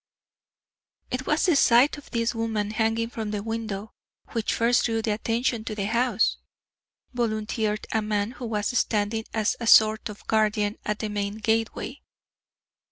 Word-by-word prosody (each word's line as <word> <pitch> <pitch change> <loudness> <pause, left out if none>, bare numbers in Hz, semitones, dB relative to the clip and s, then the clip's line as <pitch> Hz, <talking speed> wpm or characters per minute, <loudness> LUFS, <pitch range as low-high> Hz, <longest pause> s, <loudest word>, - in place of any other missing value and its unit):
"It 255 +1 -3
was 300 +1 +2
the 350 -5 +4
sight 250 +1 +5
of 290 - -16
this 230 0 0
woman 220 -2 -2
hanging 225 +1 0
from 220 -3 -4
the 210 -1 -3
window 220 -2 -4 0.4
which 230 -2 -1
first 235 +1 +2
drew 225 -1 0
attention 225 +2 -1
to 215 - -4
the 200 -2 -2
house," 230 0 +1 0.8
volunteered 215 -2 -1
a 220 - +1
man 210 0 -1
who 245 -1 -7
was 210 +1 -1
standing 220 -1 0
as 220 -1 0
a 230 - -4
sort 220 0 +6
of 210 - -10
guardian 215 -1 +1
at 210 0 -1
the 215 - -3
main 205 0 -2
gateway. 225 +4 -1
220 Hz, 155 wpm, -26 LUFS, 210-230 Hz, 0.8 s, sort